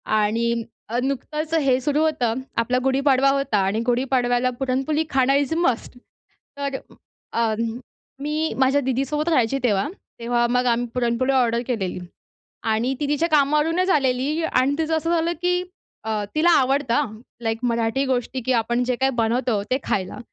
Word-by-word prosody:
आणि 230 Hz, +2 st, +1 dB, 0.3 s
अ, 235 Hz, -, -1 dB
नुकतंच 300 Hz, +4 st, -3 dB
हे 275 Hz, -5 st, +3 dB
सुरू 295 Hz, +3 st, +1 dB
होतं 260 Hz, -6 st, 0 dB, 0.2 s
आपला 245 Hz, +2 st, 0 dB
गुढीपाडवा 270 Hz, 0 st, +3 dB
होता 275 Hz, -5 st, +1 dB
आणि 200 Hz, +3 st, 0 dB
गुढीपाडव्याला 245 Hz, 0 st, +1 dB
पुरणपोळी 270 Hz, +4 st, 0 dB
खाणं 270 Hz, -1 st, +2 dB
इज 280 Hz, +1 st, +1 dB
मस्ट. 260 Hz, -7 st, -1 dB, 0.6 s
तर 280 Hz, -1 st, -3 dB, 0.6 s
अ, 230 Hz, -1 st, +1 dB, 0.7 s
मी 305 Hz, +2 st, -1 dB
माझ्या 270 Hz, +2 st, +3 dB
दीदीसोबत 275 Hz, +5 st, -1 dB
राहायची 260 Hz, -4 st, +2 dB
तेव्हा. 210 Hz, 0 st, +2 dB, 0.3 s
तेव्हा 240 Hz, 0 st, +1 dB
मग 250 Hz, +1 st, +1 dB
आम्ही 240 Hz, 0 st, +1 dB
पुरणपोळी 250 Hz, +1 st, +1 dB
ऑर्डर 235 Hz, -3 st, +2 dB
केलेली 195 Hz, -8 st, -2 dB, 0.7 s
आणि 235 Hz, +5 st, 0 dB
ती 295 Hz, -, 0 dB
तिच्या 295 Hz, +3 st, +1 dB
कामावरूनच 305 Hz, +4 st, +2 dB
आलेली. 275 Hz, +2 st, +1 dB
आणि 265 Hz, -2 st, +2 dB
तिचं 320 Hz, 0 st, +1 dB
असं 330 Hz, +1 st, -1 dB
झालं, 335 Hz, 0 st, +1 dB
की 360 Hz, 0 st, +2 dB, 0.4 s
अ, 215 Hz, -2 st, -1 dB
तिला 320 Hz, +3 st, +4 dB
आवडत 270 Hz, 0 st, +1 dB
हां, 235 Hz, -5 st, -1 dB, 0.2 s
लाइक 225 Hz, -1 st, -1 dB
मराठी 235 Hz, +2 st, +1 dB
गोष्टी, 260 Hz, 0 st, -1 dB
की 260 Hz, -, +2 dB
आपण 240 Hz, +1 st, +1 dB
जे 250 Hz, 0 st, 0 dB
काही 265 Hz, +2 st, +2 dB
बनवतो 230 Hz, -1 st, +1 dB
ते 255 Hz, -, +2 dB
खायला 190 Hz, +2 st, -2 dB
260 Hz, 155 wpm, -22 LUFS, 235-290 Hz, 0.7 s, तिला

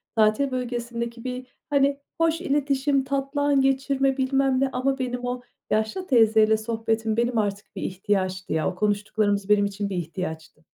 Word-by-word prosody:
tatil 220 Hz, +5 st, +3 dB
bölgesindeki 235 Hz, -2 st, -4 dB
bir, 255 Hz, 0 st, -4 dB, 0.2 s
hani, 280 Hz, -1 st, +2 dB, 0.2 s
hoş 330 Hz, +1 st, +1 dB
iletişim, 275 Hz, -2 st, +1 dB
tatlı 275 Hz, +1 st, -2 dB
an 285 Hz, -1 st, +3 dB
geçirme 270 Hz, 0 st, +1 dB
bilmem 265 Hz, 0 st, +2 dB
ne. 275 Hz, -, +2 dB
Ama 270 Hz, +2 st, 0 dB
benim 250 Hz, -1 st, -2 dB
o 245 Hz, 0 st, -3 dB, 0.3 s
yaşlı 220 Hz, -, -1 dB
teyzeyle 220 Hz, -3 st, +5 dB
sohbetim 225 Hz, 0 st, -1 dB
benim 240 Hz, 0 st, +1 dB
artık 205 Hz, 0 st, -2 dB
bir 190 Hz, -, -5 dB
ihtiyaçtı, 185 Hz, -1 st, -1 dB
ya. 160 Hz, -, +1 dB
O -, -, -7 dB
konuştuklarımız 205 Hz, 0 st, 0 dB
benim 205 Hz, -1 st, +5 dB
için 200 Hz, 0 st, -3 dB
bir 190 Hz, -, -3 dB
ihtiyaçtı. 160 Hz, -2 st, -6 dB
235 Hz, 155 wpm, -25 LUFS, 210-270 Hz, 0.3 s, teyzeyle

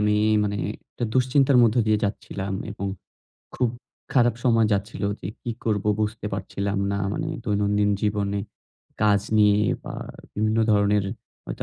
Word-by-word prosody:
আমি 105 Hz, 0 st, +3 dB, 0.3 s
মানে 100 Hz, 0 st, -1 dB, 0.4 s
একটা 120 Hz, -, -3 dB
দুশ্চিন্তার 130 Hz, +1 st, +4 dB
মধ্য 115 Hz, +1 st, +3 dB
দিয়ে 110 Hz, -1 st, +3 dB
যাচ্ছিলাম 100 Hz, -1 st, -3 dB, 0.2 s
এবং 100 Hz, -1 st, -4 dB, 0.7 s
খুব 125 Hz, -, +1 dB, 0.4 s
খারাপ 120 Hz, -3 st, +4 dB
সময় 115 Hz, -3 st, +4 dB
যাচ্ছিল 100 Hz, +2 st, -2 dB, 0.2 s
যে -, -, -5 dB, 0.2 s
কি 120 Hz, -, -3 dB
করবো 105 Hz, -2 st, 0 dB
বুঝতে 105 Hz, 0 st, -2 dB
পারছিলাম 100 Hz, +1 st, -2 dB
না 100 Hz, -, -1 dB, 0.2 s
মানে -, -, -2 dB, 0.2 s
দৈনন্দিন 105 Hz, 0 st, +1 dB
জীবনে 100 Hz, -1 st, 0 dB, 0.6 s
কাজ 105 Hz, -1 st, +4 dB, 0.2 s
নিয়ে 105 Hz, -1 st, +5 dB, 0.3 s
বা -, -, -6 dB, 0.4 s
বিভিন্ন 110 Hz, +1 st, +1 dB
ধরনের 105 Hz, -1 st, +3 dB, 0.4 s
হয়তো -, -, -5 dB
105 Hz, 140 wpm, -24 LUFS, 100-110 Hz, 0.7 s, নিয়ে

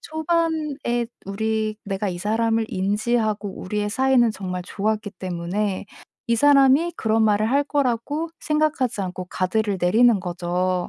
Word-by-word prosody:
초반에 315 Hz, -6 st, -1 dB, 0.2 s
우리 215 Hz, +1 st, -1 dB
내가 195 Hz, 0 st, -2 dB
이 180 Hz, -, -4 dB
사람을 225 Hz, +4 st, 0 dB
인지하고 210 Hz, +1 st, 0 dB
우리의 205 Hz, +2 st, -2 dB
사이는 260 Hz, -1 st, +3 dB
정말 185 Hz, -3 st, -5 dB
좋았기 215 Hz, +2 st, -2 dB
때문에 185 Hz, +2 st, -3 dB, 0.4 s
이 235 Hz, 0 st, +2 dB
사람이 285 Hz, +4 st, +5 dB
그런 220 Hz, 0 st, +1 dB
말을 215 Hz, +1 st, +2 dB
할 280 Hz, +2 st, +3 dB
거라고 285 Hz, +3 st, -1 dB
생각하지 300 Hz, -8 st, 0 dB
않고 185 Hz, 0 st, -5 dB
가드를 200 Hz, +3 st, -1 dB
내리는 220 Hz, +5 st, +4 dB
거죠. 180 Hz, 0 st, -2 dB
220 Hz, 305 characters per minute, -23 LUFS, 195-260 Hz, 0.4 s, 사람이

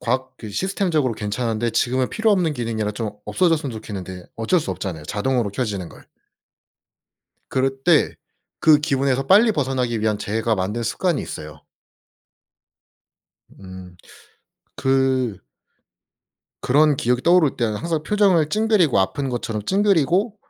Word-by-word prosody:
과학 130 Hz, +2 st, -2 dB
그 110 Hz, -, -9 dB
시스템적으로 160 Hz, -, 0 dB
괜찮은데 110 Hz, +2 st, -2 dB
지금은 130 Hz, +2 st, 0 dB
필요 220 Hz, 0 st, +1 dB
없는 175 Hz, -6 st, +1 dB
기능이라 115 Hz, -3 st, -2 dB
좀 110 Hz, 0 st, -4 dB
없어졌으면 165 Hz, -8 st, +1 dB
좋겠는데 95 Hz, -4 st, -7 dB
어쩔 115 Hz, +11 st, +1 dB
수 155 Hz, -, -5 dB
없잖아요 80 Hz, -6 st, -5 dB
자동으로 115 Hz, +3 st, -1 dB
켜지는 100 Hz, -5 st, -3 dB
걸. -, -, -16 dB, 1.4 s
그럴 135 Hz, +1 st, -1 dB
때 170 Hz, -4 st, +3 dB, 0.5 s
그 155 Hz, -2 st, +7 dB
기분에서 135 Hz, -3 st, 0 dB
빨리 215 Hz, +7 st, +6 dB
벗어나기 130 Hz, -, -1 dB
위한 105 Hz, -1 st, 0 dB
제가 110 Hz, +2 st, -1 dB
만든 105 Hz, +5 st, -2 dB
습관이 170 Hz, -, 0 dB
있어요. 75 Hz, -1 st, -8 dB, 2.0 s
음 95 Hz, -1 st, -11 dB, 0.8 s
그 130 Hz, -5 st, +1 dB, 1.2 s
그런 145 Hz, +2 st, +3 dB
기억이 125 Hz, 0 st, 0 dB
떠오를 170 Hz, -4 st, +4 dB
때는 110 Hz, -3 st, -1 dB
항상 165 Hz, +3 st, -2 dB
표정을 185 Hz, -4 st, +2 dB
찡그리고 210 Hz, -, +2 dB
아픈 115 Hz, +8 st, -1 dB
것처럼 115 Hz, -3 st, -3 dB
찡그리고 195 Hz, -, +2 dB
130 Hz, 305 characters per minute, -21 LUFS, 110-160 Hz, 2.0 s, 그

